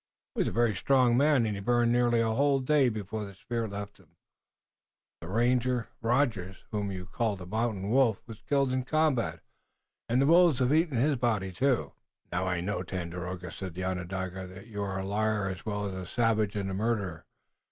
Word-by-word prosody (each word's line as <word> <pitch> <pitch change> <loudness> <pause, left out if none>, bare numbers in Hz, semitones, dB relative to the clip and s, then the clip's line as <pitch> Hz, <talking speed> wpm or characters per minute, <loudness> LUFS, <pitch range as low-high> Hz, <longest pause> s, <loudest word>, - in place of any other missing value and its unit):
He - - -5
was - - +2
a - - -1
very 120 -2 +2
strong 125 +4 +3
man, 140 -2 +4
and 105 - -1
he - - -5
burned 120 +2 +2
nearly 120 -1 +3
a 115 -1 +1
whole 140 +2 +3
day 135 0 +3
before 110 -1 -4
the 100 -1 -9
spirit 115 +3 -3
left 100 0 -7
him. 85 -3 -24 1.0
The 85 - -9
ranger, 120 +3 +1
Rogers, 115 -6 0
whom 105 -2 -2
you 90 -1 -6
called 105 +1 -1
the 90 - -9
Mountain 105 0 -2
Wolf, 125 -5 +3
was 115 -2 -10
killed 135 +1 +1
in 130 - +1
the 125 - -5
combat, 130 - +1 0.7
and 120 +2 +3
the 135 - +4
wolves 170 -2 +6
have 130 +1 +2
eaten 160 -4 +2
his 140 +3 +2
body, 110 -6 0
too." 130 +6 0 0.4
"Now, 90 +2 -1
I 90 -2 0
know, 100 +4 -2
O - - -3
Tandakora," 90 0 -5
said 95 -4 -7
the 95 - -4
Onondaga, 95 0 -4
"that 95 +2 -11
you 105 -3 -6
are 95 -1 -2
a 95 - -3
liar, 105 0 0
as 95 +3 -7
well 105 -1 -2
as 100 - -4
a 95 -1 -6
savage 110 -3 +1
and 100 -2 -2
a - - -3
murderer. 100 -5 -2
110 Hz, 205 wpm, -29 LUFS, 95-125 Hz, 1.0 s, wolves